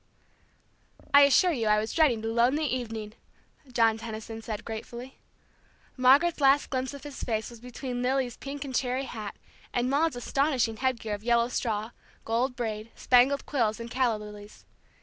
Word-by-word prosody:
"I 285 Hz, -, +9 dB
assure 350 Hz, +6 st, +4 dB
you 235 Hz, -8 st, -1 dB
I 210 Hz, 0 st, +4 dB
was 215 Hz, +1 st, -2 dB
dreading 280 Hz, -9 st, +3 dB
the 225 Hz, -, -4 dB
lonely 245 Hz, +7 st, +2 dB
evening," 225 Hz, -5 st, -3 dB, 0.6 s
John 225 Hz, -2 st, +3 dB
Tenison 225 Hz, 0 st, -7 dB
said 220 Hz, -1 st, -6 dB
gratefully. 235 Hz, +3 st, -7 dB, 0.8 s
Margaret's 280 Hz, +6 st, +4 dB
last 275 Hz, +1 st, +4 dB
glimpse 260 Hz, +1 st, -2 dB
of 280 Hz, -, -11 dB
his 290 Hz, -2 st, -8 dB
face 220 Hz, -1 st, -2 dB
was 235 Hz, -, -12 dB
between 250 Hz, +1 st, -5 dB
Lily's 255 Hz, -1 st, 0 dB
pink 280 Hz, +2 st, -6 dB
and 265 Hz, -, -6 dB
cherry 255 Hz, +1 st, 0 dB
hat, 215 Hz, -5 st, -6 dB, 0.4 s
and 245 Hz, +1 st, 0 dB
Maude's 300 Hz, 0 st, +2 dB
astonishing 245 Hz, -2 st, 0 dB
headgear 235 Hz, -4 st, -1 dB
of 205 Hz, 0 st, -6 dB
yellow 235 Hz, 0 st, +2 dB
straw, 220 Hz, -2 st, -2 dB, 0.3 s
gold 245 Hz, +3 st, 0 dB
braid, 220 Hz, -2 st, -4 dB
spangled 260 Hz, +3 st, +3 dB
quills, 230 Hz, -6 st, 0 dB
and 230 Hz, 0 st, -7 dB
calla 250 Hz, -4 st, +1 dB
lilies. 210 Hz, 0 st, -11 dB
245 Hz, 160 wpm, -28 LUFS, 225-265 Hz, 0.8 s, I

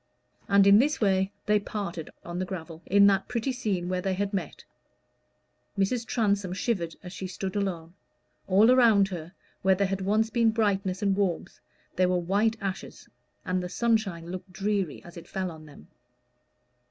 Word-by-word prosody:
And 200 Hz, 0 st, +5 dB
in 200 Hz, +1 st, +7 dB
this 295 Hz, +5 st, +2 dB
way 190 Hz, -2 st, +2 dB
they 210 Hz, 0 st, +3 dB
parted 195 Hz, -6 st, -5 dB
on 175 Hz, +1 st, -5 dB
the 185 Hz, -, -1 dB
gravel, 165 Hz, -3 st, -7 dB
in 200 Hz, +1 st, +6 dB
that 195 Hz, -1 st, +3 dB
pretty 245 Hz, +2 st, -1 dB
scene 205 Hz, -8 st, -2 dB
where 185 Hz, 0 st, -1 dB
they 190 Hz, 0 st, -1 dB
had 200 Hz, +2 st, -2 dB
met. 195 Hz, -, -4 dB, 1.1 s
Mrs. 230 Hz, +5 st, 0 dB
Transome 200 Hz, -5 st, 0 dB
shivered 185 Hz, -5 st, -2 dB
as 180 Hz, 0 st, -8 dB
she 190 Hz, -, -5 dB
stood 190 Hz, +1 st, -5 dB
alone: 175 Hz, -5 st, -3 dB, 0.5 s
all 205 Hz, +5 st, +5 dB
around 225 Hz, -6 st, +5 dB
her, 175 Hz, -1 st, -7 dB, 0.3 s
where 190 Hz, 0 st, +4 dB
there 200 Hz, +2 st, +1 dB
had 195 Hz, 0 st, -2 dB
once 215 Hz, +3 st, +1 dB
been 230 Hz, 0 st, +3 dB
brightness 200 Hz, -4 st, 0 dB
and 200 Hz, -1 st, +2 dB
warmth, 190 Hz, -10 st, -2 dB, 0.4 s
there 185 Hz, 0 st, +3 dB
were 180 Hz, -, +2 dB
white 200 Hz, +6 st, +1 dB
ashes, 195 Hz, -2 st, -6 dB, 0.4 s
and 185 Hz, 0 st, 0 dB
the 180 Hz, -, -5 dB
sunshine 215 Hz, -6 st, 0 dB
looked 185 Hz, 0 st, -7 dB
dreary 200 Hz, -4 st, -2 dB
as 175 Hz, 0 st, -12 dB
it 170 Hz, 0 st, -10 dB
fell 185 Hz, -2 st, -3 dB
on 155 Hz, -1 st, -12 dB
them. 145 Hz, -, -15 dB
195 Hz, 175 wpm, -27 LUFS, 180-210 Hz, 1.1 s, in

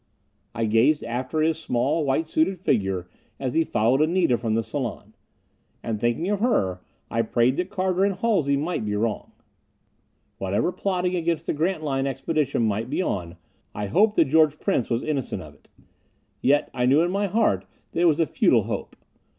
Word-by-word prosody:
I 115 Hz, -, 0 dB
gazed 115 Hz, +8 st, +3 dB
after 125 Hz, +6 st, -2 dB
his 160 Hz, 0 st, +1 dB
small, 135 Hz, +4 st, 0 dB
white 140 Hz, +3 st, +1 dB
suited 165 Hz, +4 st, 0 dB
figure 95 Hz, -, 0 dB, 0.3 s
as 130 Hz, -2 st, -2 dB
he 165 Hz, -, +3 dB
followed 125 Hz, +1 st, +1 dB
Anita 165 Hz, -4 st, +3 dB
from 115 Hz, -2 st, -1 dB
the 115 Hz, -, +1 dB
salon. 115 Hz, -5 st, -5 dB, 0.7 s
And 110 Hz, -2 st, -3 dB
thinking 120 Hz, +9 st, 0 dB
of 205 Hz, -1 st, 0 dB
her, 95 Hz, -, +1 dB, 0.3 s
I 115 Hz, -, +1 dB
prayed 120 Hz, +3 st, +2 dB
that 180 Hz, +1 st, -2 dB
Carter 190 Hz, -1 st, 0 dB
and 200 Hz, -1 st, +1 dB
Halsey 175 Hz, -13 st, +1 dB
might 155 Hz, -2 st, -2 dB
be 105 Hz, -1 st, -2 dB
wrong. 110 Hz, +1 st, -2 dB, 1.1 s
Whatever 100 Hz, -, 0 dB
plotting 180 Hz, -1 st, -1 dB
against 165 Hz, -2 st, -1 dB
the -, -, -1 dB
Grantline 155 Hz, -4 st, -1 dB
Expedition 135 Hz, -1 st, -1 dB
might 110 Hz, +2 st, -1 dB
be -, -, -2 dB
going 90 Hz, -, -2 dB
on, -, -, -20 dB, 0.4 s
I 105 Hz, -, -3 dB
hoped 205 Hz, -, +3 dB
that -, -, +5 dB
George 155 Hz, +1 st, +3 dB
Prince 120 Hz, -, 0 dB
was 115 Hz, -1 st, 0 dB
innocent 145 Hz, -4 st, -3 dB
of -, -, -13 dB
it. -, -, -26 dB, 0.7 s
Yet 145 Hz, +2 st, +2 dB
I 125 Hz, 0 st, 0 dB
knew 145 Hz, +5 st, +5 dB
in 175 Hz, -, 0 dB
my 200 Hz, +1 st, 0 dB
heart 175 Hz, -, +1 dB, 0.3 s
it 175 Hz, -, +2 dB
was 160 Hz, -2 st, +3 dB
a 165 Hz, -, +4 dB
futile -, -, +3 dB
hope. -, -, -5 dB
140 Hz, 180 wpm, -24 LUFS, 115-170 Hz, 1.1 s, that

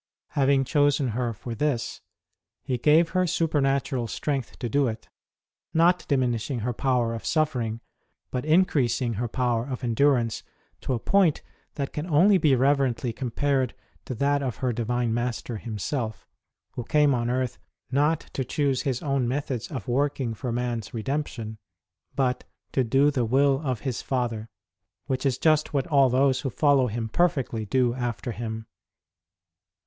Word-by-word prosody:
Having 140 Hz, -1 st, +3 dB
chosen 145 Hz, -1 st, +2 dB
her 120 Hz, +1 st, -1 dB
for 115 Hz, +2 st, -7 dB
this, 125 Hz, -2 st, -2 dB, 0.6 s
He 125 Hz, -2 st, -2 dB
gave 155 Hz, +5 st, +4 dB
her 185 Hz, -1 st, +1 dB
super 160 Hz, -3 st, +1 dB
natural 135 Hz, -3 st, 0 dB
strength 135 Hz, +2 st, -3 dB
to 120 Hz, -, -3 dB
do 140 Hz, +4 st, +2 dB
it 110 Hz, -1 st, -5 dB, 0.7 s
not 175 Hz, +2 st, +3 dB
diminishing 125 Hz, -2 st, 0 dB
her 120 Hz, +3 st, -1 dB
power 125 Hz, -2 st, +1 dB
of 115 Hz, -, -6 dB
suffering, 125 Hz, -8 st, 0 dB, 0.5 s
but 125 Hz, -, -2 dB
increasing 145 Hz, -7 st, +2 dB
her 120 Hz, -, 0 dB
power 120 Hz, 0 st, 0 dB
of 130 Hz, -1 st, -5 dB
endurance 120 Hz, -1 st, +2 dB, 0.4 s
to -, -, -2 dB
a -, -, -3 dB
point 185 Hz, -, +2 dB, 0.3 s
that 140 Hz, -2 st, -3 dB
can 150 Hz, +3 st, -4 dB
only 180 Hz, +5 st, +5 dB
be 145 Hz, -5 st, +4 dB
reverently 130 Hz, -3 st, +1 dB
compared 130 Hz, +1 st, -1 dB, 0.3 s
to 130 Hz, -, -4 dB
that 140 Hz, +3 st, +1 dB
of 130 Hz, -4 st, -2 dB
her 125 Hz, -2 st, -1 dB
Divine 120 Hz, 0 st, -1 dB
Master 120 Hz, -1 st, -2 dB
Himself, 110 Hz, +2 st, -4 dB, 0.5 s
Who 120 Hz, -, -5 dB
came 150 Hz, +2 st, +3 dB
on 120 Hz, -1 st, 0 dB
earth 125 Hz, 0 st, -1 dB, 0.3 s
not 150 Hz, +4 st, +2 dB
to 135 Hz, -, -1 dB
choose 140 Hz, -1 st, 0 dB
His 130 Hz, -4 st, -2 dB
own 135 Hz, -4 st, 0 dB
methods 125 Hz, -3 st, -2 dB
of 130 Hz, -8 st, -6 dB
working 135 Hz, -1 st, 0 dB
for 125 Hz, +2 st, -4 dB
man 120 Hz, 0 st, -1 dB
s 110 Hz, -, -10 dB
redemption, 115 Hz, -3 st, -3 dB, 0.6 s
but 125 Hz, -2 st, 0 dB, 0.3 s
to 130 Hz, -, +2 dB
do 135 Hz, +5 st, +3 dB
the 130 Hz, -4 st, 0 dB
will 135 Hz, +4 st, +3 dB
of 130 Hz, -6 st, -2 dB
His 130 Hz, -4 st, -3 dB
Father, 120 Hz, -4 st, -2 dB, 0.6 s
which 130 Hz, +1 st, -1 dB
is 130 Hz, -2 st, 0 dB
just 155 Hz, 0 st, +2 dB
what 135 Hz, -, +1 dB
all 140 Hz, -5 st, +4 dB
those 130 Hz, +1 st, +2 dB
who 135 Hz, -, -2 dB
follow 135 Hz, +3 st, +3 dB
Him 115 Hz, 0 st, -3 dB
perfectly 125 Hz, -6 st, 0 dB
do 125 Hz, +2 st, +2 dB
after 120 Hz, 0 st, -3 dB
Him. 110 Hz, 0 st, -5 dB
130 Hz, 160 wpm, -26 LUFS, 120-145 Hz, 0.7 s, only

